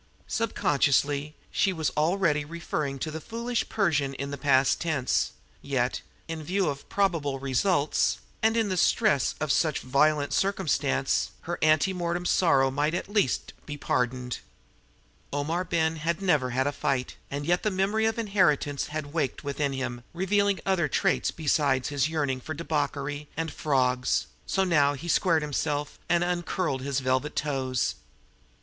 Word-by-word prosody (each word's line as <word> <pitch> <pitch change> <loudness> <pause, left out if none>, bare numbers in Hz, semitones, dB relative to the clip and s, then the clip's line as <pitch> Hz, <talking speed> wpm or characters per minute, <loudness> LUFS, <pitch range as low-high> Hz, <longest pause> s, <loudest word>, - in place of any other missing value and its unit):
Sub 230 0 -2
consciously, 145 +1 +2 0.2
she 195 - +2
was 160 -4 -1
already 155 -1 +1
referring 150 -3 -3
to 155 +4 -4
the 160 +1 -6
foolish 235 +3 -3
Persian 145 -10 +1
in 140 +1 -4
the - - -3
past 135 -1 +3
tense; 155 -7 0 0.3
yet, 125 -3 -1 0.3
in 165 -1 -4
view 185 +2 0
of 140 -1 -6
probable 165 -9 0
results, 140 +4 +1 0.2
and 225 +1 +3
in 220 -3 +1
the 185 - -1
stress 195 - +3
of 155 -1 0
such 155 0 +1
violent 145 +3 +2
circumstance, 155 -8 +1
her 170 +1 -4
anti 155 +4 +4
mortem 175 0 -2
sorrow 135 -8 +3
might 150 +4 0
at 185 - -4
least 200 - +1
be 145 -1 -5
pardoned. 125 -2 -1 0.9
Omar 155 +5 -1
Ben 165 -2 0
had 165 +2 -1
never 150 -10 +2
had 130 +2 0
a 145 - +1
fight, 135 -2 -1
and 145 +1 -4
yet 175 +2 +2
the 215 - +1
memory 205 +3 +1
of 225 - -1
inheritance 170 -10 +1
had 150 -1 -5
waked 150 -5 -1
within 140 0 -1
him, 130 -3 -4
revealing 200 +2 +2
other 185 -5 +2
traits - - +1
besides 140 -4 +1
his 145 0 +1
yearning 140 -5 -1
for 155 +5 -5
debauchery 145 -2 -2
and 160 -1 -2
"frawgs"; 125 -3 +1 0.2
so 190 - +1
now 145 -6 +3
he 145 +5 -7
squared 165 -2 +3
himself 150 0 -2
and 175 0 +3
uncurled 175 -5 -1
his 140 0 -1
velvet 130 +3 0
toes. 130 -4 0
150 Hz, 155 wpm, -27 LUFS, 140-175 Hz, 0.9 s, anti